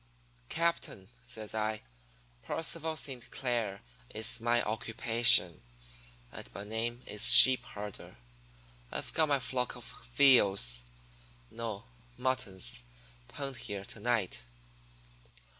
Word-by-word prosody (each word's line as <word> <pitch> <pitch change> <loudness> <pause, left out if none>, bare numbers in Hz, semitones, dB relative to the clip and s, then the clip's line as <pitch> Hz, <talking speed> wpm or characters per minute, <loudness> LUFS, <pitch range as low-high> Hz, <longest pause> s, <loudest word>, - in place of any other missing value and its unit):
"'Captain,' 170 - -4
says 105 - -9
I, 110 0 -4 0.6
'Percival 160 - -5
Saint 130 -6 -6
Clair 115 -6 -4 0.3
is 110 +2 -1
my 120 0 0
occupation, 115 -4 +2 0.7
and - - -11
my 100 - -8
name 115 +3 -6
is 105 - +4
sheep 130 -1 +11
herder. 105 -1 -11 0.7
I've - - -7
got 155 -2 0
my 140 -1 +1
flock 125 -1 -4
of 125 - -11 0.3
veals 100 - +3 0.7
no, 115 -3 -7 0.3
muttons 100 - -3 0.5
penned 135 -3 -8
here 100 -4 -8
to - - -10
night. 105 - -3
115 Hz, 105 wpm, -30 LUFS, 100-130 Hz, 0.7 s, sheep